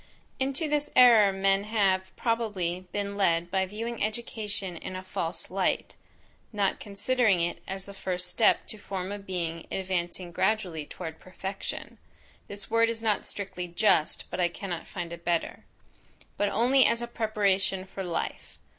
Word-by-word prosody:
Into 275 +4 0
this 295 0 0
error 230 -5 +8
men 195 +1 +2
have, 190 -3 +2
probably, 195 -7 -1
been 200 -1 -2
led 175 -3 +2
by 190 -1 +2
viewing 225 +3 -3
education 210 -3 -3
in 185 - -6
a 185 - -5
false 170 -2 -4
light; 190 0 0 0.6
not 205 -3 +1
considering 210 0 +2
it 170 +1 -1
as 190 0 -5
the 200 - -9
first 180 -2 -3
step 215 +5 +3
to 215 - -7
form 190 -1 -4
a 205 - -4
being 170 -4 -4
advancing 180 -1 -2
gradually 185 -5 0
toward 160 -3 -7
perfection; 190 +1 -6 0.5
(This 200 -1 -3
word 230 0 +4
is 225 0 -3
not 215 -2 +1
strictly 185 -3 -3
just, 170 -3 +2
but - - -3
I 175 - +4
cannot 175 -1 -5
find 170 -2 -5
a 170 - -7
better.) 170 -1 -1 0.7
but 205 - +1
only 250 +6 +5
as 235 +1 +1
a - - -3
preparation 200 -4 +1
for 195 0 -6
life. 175 -2 -4
195 Hz, 155 wpm, -28 LUFS, 180-215 Hz, 0.7 s, error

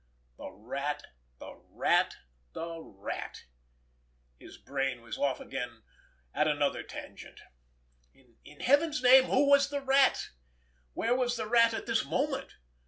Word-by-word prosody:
The - - -7
Rat! 140 +8 -5 0.3
The - - -10 0.2
Rat! - - +1 0.4
The 165 0 -6
Rat! 100 -10 -7 1.0
His - - -13
brain 135 -3 -3
was 115 - -6
off 140 -2 0
again 125 -4 -6 0.5
at 155 - +2
another 145 -2 0
tangent. - - -10 1.0
In 150 - -14
Heaven's 290 +1 +2
name, 260 +1 +8
who 280 +2 +2
was 280 0 +5
the 285 0 -3
Rat? 270 0 +3 0.6
Where 230 - 0
was 245 -1 0
the - - -3
Rat 230 0 +4
at - - -5
this 230 -1 +1
moment? 265 - -2
225 Hz, 130 wpm, -30 LUFS, -, 1.0 s, name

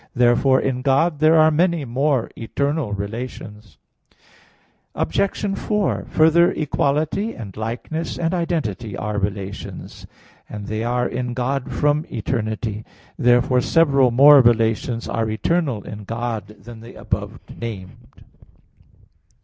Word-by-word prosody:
Therefore 125 +2 +4
in 130 -2 -2
God 145 +4 +2
there 155 +1 +5
are 155 0 +6
many 170 -1 +1
more 130 0 0
eternal 140 +2 -2
relations. 105 - -7 1.2
Obj. 195 - -1
4: 210 -2 -1
Further, 170 +3 +4
equality, 155 +8 -1
and 100 -6 -9
likeness, 120 +9 -4
and 165 +1 -1
identity 145 - -2
are 105 0 -2
relations: 100 0 -6 0.4
and 105 -1 -7
they 110 +1 -3
are 125 +1 0
in 125 -1 -4
God 130 +1 -2
from 150 +1 +1
eternity. 110 -2 -3 0.4
Therefore 125 +1 +3
several 140 -4 +3
more 140 +4 +8
relations 115 0 +1
are 115 -1 -1
eternal 130 - -1
in 105 0 -9
God 115 -1 -4
than 110 +2 -13
the 115 +2 -12
above 105 +3 -4 0.2
named. 100 -6 -9
125 Hz, 115 wpm, -21 LUFS, 110-150 Hz, 1.2 s, more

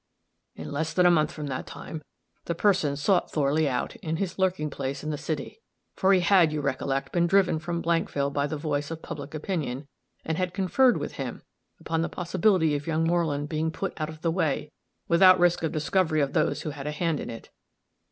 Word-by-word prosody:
In - - -7
less 155 +2 -2
than 180 - +4
a 175 - +7
month 155 -3 +2
from 150 - -6
that 130 -2 -4
time, 160 - -7 0.4
the 170 - -2
person 175 -6 +2
had - - -5
sought 175 +5 +2
Thorley 150 +1 +1
out, 125 -2 -2
in 160 0 -3
his 185 +1 -3
lurking 180 -5 0
place 135 0 -4
in 155 - -2
the - - -1
city 155 - -5 0.3
for 190 0 +3
he 190 -2 +5
had, 175 -3 +5
you 155 - -2
recollect, 135 -1 -2
been 170 -1 +3
driven 185 -3 +3
from 170 +1 -3
Blankville 145 -4 0
by 145 0 0
the 155 - -3
voice 145 -1 -2
of 165 0 -7
public 150 -2 -7
opinion 150 -5 -3 0.4
and 160 +1 -2
had 180 -1 -2
conferred 240 +7 +3
with - - -5
him - - -5 0.4
upon 165 0 -1
the 165 - -1
possibility 180 -3 +2
of 145 +2 -4
young 160 0 +1
Moreland 165 -4 0
being 155 +1 -1
put 195 +4 -4
out 155 - -1
of 155 -1 -10
the 165 - +2
way, 150 -4 -1 0.4
without 185 +2 +7
risk 175 -1 +3
of 160 - -1
discovery 155 +1 +1
of 140 -1 -1
those 155 0 +1
who 155 - -3
had 140 0 -7
a - - -1
hand 160 0 -1
in - - -5
it. 115 -1 -9
160 Hz, 215 wpm, -27 LUFS, 145-175 Hz, 0.4 s, a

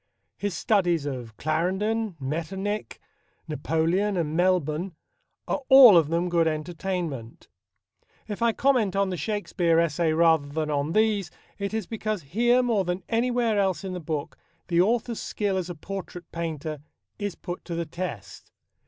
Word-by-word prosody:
His 205 -3 -2
studies 175 -6 +1
of 125 -6 -6
Clarendon, 190 +6 -1
Metternich, 190 +9 -3 0.5
Napoleon 165 +6 0
and 160 -2 -1
Melbourne 175 -1 +1 0.5
are - - -1
all 265 -6 +10
of 160 -3 +4
them 170 +2 0
good 170 -2 +2
entertainment. 160 -5 -4 0.8
If 210 +1 -5
I 235 0 +4
comment 235 -6 +2
on 195 -1 +1
the - - -2
Shakespeare 175 -2 +1
essay 165 0 +1
rather 160 -3 +4
than 150 +1 -2
on 145 +2 -1
these, 215 -4 +2 0.3
it 200 0 -2
is 220 -2 -2
because 215 -3 -3
here 240 - +3
more 225 -5 +2
than 180 +1 -3
anywhere 235 -2 +1
else 190 -1 0
in 190 -1 -4
the 180 - -4
book 155 -3 -4 0.3
the 170 0 +4
author's 230 +3 0
skill 205 -2 -1
as 185 -1 -2
a 175 - -5
portrait 180 0 -7
painter 160 -2 -4 0.4
is 205 -3 -3
put 175 -1 -7
to 170 - -4
the 170 0 -2
test. 165 - -7
180 Hz, 155 wpm, -26 LUFS, 160-205 Hz, 0.8 s, all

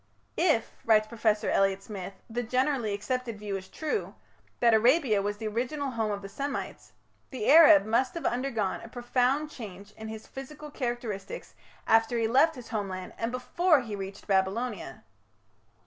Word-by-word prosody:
"If", 315 -10 +2
writes 215 -1 +4
Professor 215 -1 0
Elliot 195 0 +2
Smith, 195 -2 -7
"the 240 +1 -2
generally 255 -1 0
accepted 230 +2 -3
view 205 -1 -4
is 190 -1 -6
true, 315 - -3 0.4
that 235 -1 +5
Arabia 235 -1 +4
was 205 +1 -2
the 220 - -6
original 255 +6 -2
home 225 -3 -1
of 200 -1 -3
the - - -5
Semites, 275 +8 -5 0.4
the 255 -5 -4
Arab 315 -4 +8
must 245 +5 +1
have 335 - -5
undergone 240 -5 -1
a - - -9
profound 255 +5 0
change 200 -5 -9
in 220 +1 -9
his 220 0 -7
physical 295 +3 -9
characters 240 -6 -4 0.6
after 225 +2 +3
he 225 -1 +1
left 275 +8 +4
his 250 -3 -10
homeland 190 -5 -4
and 230 +1 -1
before 300 +5 +2
he 220 -4 -5
reached 195 0 -7
Babylonia." 195 - -1
230 Hz, 160 wpm, -28 LUFS, 210-260 Hz, 0.6 s, Arab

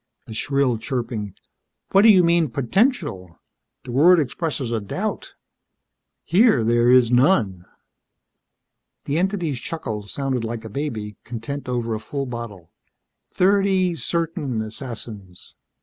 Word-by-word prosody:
The 110 - -9
shrill 135 0 0
chirping: 115 -5 -4 0.6
"What 195 - +6
do 225 - +7
you 190 -4 +7
mean, 170 -2 +3
potential? 140 - -1 0.4
The 125 - -8
word 165 +8 +6
expresses 140 -2 -2
a 115 -2 -1
doubt. 100 - -4 0.9
Here 180 - +4
there 120 +1 +3
is 125 -2 +5
none." 120 - +2 1.4
The 145 +3 0
entity's 175 -8 -1
chuckle 115 -9 -4
sounded 130 +3 -3
like 115 0 -5
a - - -6
baby, 110 -6 -4
content 125 +4 -6
over 120 -2 -1
a 110 - -3
full 140 +4 -4
bottle. 115 -9 -8 0.6
"Thirty 190 -1 +2
certain 165 -7 -2
assassins." 110 -5 -8
125 Hz, 120 wpm, -22 LUFS, 115-165 Hz, 1.4 s, do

